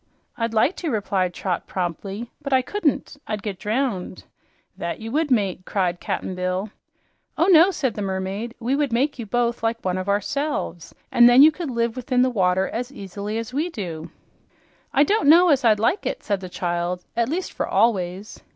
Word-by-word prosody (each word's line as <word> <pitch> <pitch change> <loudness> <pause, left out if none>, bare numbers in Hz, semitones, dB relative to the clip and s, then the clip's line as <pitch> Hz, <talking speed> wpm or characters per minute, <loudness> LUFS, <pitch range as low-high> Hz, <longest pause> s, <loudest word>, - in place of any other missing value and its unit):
"I'd 230 -1 -2
like 225 +10 +2
to," 335 - -3
replied 195 -6 0
Trot 180 0 -3
promptly, 195 +5 -4
"but 280 - -5
I 260 -1 +4
couldn't. 320 -5 -1
I'd 210 -2 -3
get 200 -4 -4
drowned." 215 -5 -2 0.5
"That 170 - -4
you 225 0 -6
would, 305 +3 0
mate!" 200 -8 +1
cried 180 -3 -1
Cap'n 190 -2 -3
Bill. 185 +3 -2 0.7
"Oh 335 - +3
no," 350 -1 +7
said 290 - -1
the 210 - -5
mermaid. 195 +4 -3
"We 245 +3 0
would 285 -3 0
make 260 +4 0
you 230 - -5
both 240 +2 0
like 230 -1 -2
one 185 0 0
of 185 +2 -4
ourselves, 210 - -2 0.2
and 240 0 +7
then 250 +3 +8
you 310 - +8
could 325 -1 -5
live 235 -1 -1
within 250 0 +1
the 255 - +1
water 190 -3 +2
as 245 +3 -4
easily 205 -2 -5
as 230 +2 -5
we 310 +6 0
do." 170 - -6 0.8
"I 280 - +4
don't 400 -2 +2
know 345 +3 +7
as 275 -4 +3
I'd 215 -3 +4
like 285 - +1
that," - - -4
said 200 -2 -1
the 185 -1 -8
child, 175 0 -2
"at 235 +1 +1
least 360 +5 -3
for - - -2
always." 195 -2 0
225 Hz, 195 wpm, -23 LUFS, 190-270 Hz, 0.8 s, then